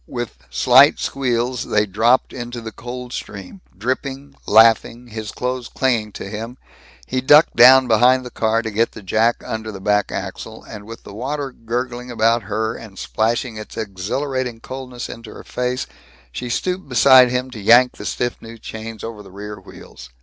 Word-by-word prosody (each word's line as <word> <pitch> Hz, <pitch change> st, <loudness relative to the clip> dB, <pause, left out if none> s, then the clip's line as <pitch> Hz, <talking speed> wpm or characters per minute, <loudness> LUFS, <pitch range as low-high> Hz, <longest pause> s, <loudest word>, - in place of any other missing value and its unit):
With 120 Hz, -2 st, -6 dB
slight 130 Hz, +3 st, +6 dB
squeals 125 Hz, -2 st, -1 dB
they 105 Hz, 0 st, +1 dB
dropped 110 Hz, +6 st, +2 dB
into 120 Hz, -1 st, -6 dB
the 110 Hz, -1 st, -7 dB
cold 125 Hz, +3 st, -8 dB
stream. 95 Hz, -2 st, -8 dB, 0.2 s
Dripping, 135 Hz, +5 st, -4 dB
laughing, 115 Hz, +2 st, +4 dB
his 110 Hz, -1 st, -6 dB
clothes 125 Hz, -1 st, -4 dB
clinging 115 Hz, -5 st, 0 dB
to -, -, -7 dB
him, 115 Hz, +4 st, -7 dB, 0.5 s
he 130 Hz, 0 st, -2 dB
ducked 150 Hz, +4 st, +5 dB
down 130 Hz, +2 st, +8 dB
behind 125 Hz, +3 st, +4 dB
the 125 Hz, -, -8 dB
car 115 Hz, +1 st, 0 dB
to 110 Hz, -, -4 dB
get 115 Hz, +3 st, 0 dB
the 105 Hz, -, -11 dB
jack 110 Hz, +5 st, +1 dB
under 110 Hz, 0 st, -4 dB
the 100 Hz, -, -8 dB
back 105 Hz, +1 st, +1 dB
axle, -, -, -6 dB
and 105 Hz, -1 st, -10 dB
with 115 Hz, 0 st, -10 dB
the 100 Hz, -, -11 dB
water 135 Hz, +5 st, -4 dB
gurgling 125 Hz, +1 st, -4 dB
about 115 Hz, 0 st, +2 dB
her 110 Hz, +2 st, -2 dB
and 105 Hz, -4 st, -11 dB
splashing 115 Hz, +3 st, -1 dB
its 110 Hz, -, -9 dB
exhilarating 115 Hz, +5 st, -3 dB
coldness 130 Hz, 0 st, -7 dB
into 115 Hz, -2 st, -10 dB
her -, -, -10 dB
face, 125 Hz, +1 st, -3 dB, 0.5 s
she 120 Hz, -, -6 dB
stooped 180 Hz, +6 st, -2 dB
beside 130 Hz, 0 st, +7 dB
him 125 Hz, +1 st, -2 dB
to 115 Hz, -, -8 dB
yank 120 Hz, +5 st, +5 dB
the -, -, -8 dB
stiff 120 Hz, 0 st, -3 dB
new 115 Hz, 0 st, -10 dB
chains 110 Hz, 0 st, -8 dB
over 115 Hz, -2 st, -7 dB
the 100 Hz, -, -14 dB
rear 105 Hz, +2 st, -9 dB
wheels. -, -, -13 dB
120 Hz, 175 wpm, -20 LUFS, 110-125 Hz, 0.5 s, down